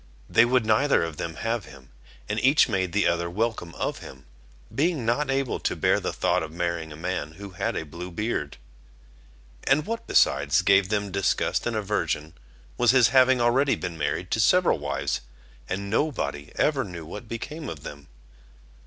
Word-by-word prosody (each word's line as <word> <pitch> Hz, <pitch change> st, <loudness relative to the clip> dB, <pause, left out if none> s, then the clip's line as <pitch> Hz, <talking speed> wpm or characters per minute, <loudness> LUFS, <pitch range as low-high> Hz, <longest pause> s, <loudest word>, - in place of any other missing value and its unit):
They -, -, +5 dB
would 125 Hz, -1 st, +2 dB
neither 110 Hz, +4 st, +3 dB
of 85 Hz, -2 st, -5 dB
them 85 Hz, -1 st, -4 dB
have 115 Hz, +3 st, -2 dB
him, 65 Hz, -3 st, -15 dB, 0.4 s
and 105 Hz, +2 st, -1 dB
each 140 Hz, +7 st, +5 dB
made 95 Hz, -6 st, -1 dB
the 105 Hz, +3 st, +1 dB
other 85 Hz, 0 st, +1 dB
welcome 105 Hz, -3 st, -2 dB
of -, -, -3 dB
him, 65 Hz, -1 st, -12 dB, 0.5 s
being 145 Hz, 0 st, 0 dB
not 130 Hz, +5 st, +1 dB
able 135 Hz, -1 st, 0 dB
to -, -, -1 dB
bear -, -, +2 dB
the -, -, -2 dB
thought -, -, +1 dB
of 80 Hz, -1 st, -5 dB
marrying 85 Hz, -1 st, -3 dB
a -, -, -8 dB
man 80 Hz, -2 st, -4 dB
who 100 Hz, +3 st, -10 dB
had 90 Hz, -, -2 dB
a 80 Hz, -, -3 dB
blue 85 Hz, +5 st, -8 dB
beard. 90 Hz, -6 st, -3 dB, 1.1 s
And 145 Hz, +3 st, +3 dB
what 230 Hz, +1 st, -4 dB
besides 75 Hz, +6 st, +3 dB
gave 95 Hz, 0 st, +4 dB
them 105 Hz, -2 st, -1 dB
disgust 100 Hz, +4 st, 0 dB
and 120 Hz, -, -2 dB
aversion, 100 Hz, -7 st, -2 dB, 0.5 s
was 120 Hz, -, +4 dB
his 125 Hz, -1 st, +6 dB
having 130 Hz, 0 st, +5 dB
already 130 Hz, +4 st, +3 dB
been 85 Hz, -, -5 dB
married 85 Hz, +3 st, -2 dB
to -, -, +1 dB
several 180 Hz, -, +4 dB
wives, 70 Hz, -1 st, -2 dB, 0.5 s
and 100 Hz, +2 st, -3 dB
nobody 110 Hz, -, -1 dB
ever 145 Hz, -3 st, +2 dB
knew 85 Hz, -5 st, -8 dB
what 105 Hz, +8 st, -8 dB
became 150 Hz, +6 st, -6 dB
of 75 Hz, -3 st, -8 dB
them. 70 Hz, -2 st, -9 dB
100 Hz, 180 wpm, -25 LUFS, 85-125 Hz, 1.1 s, his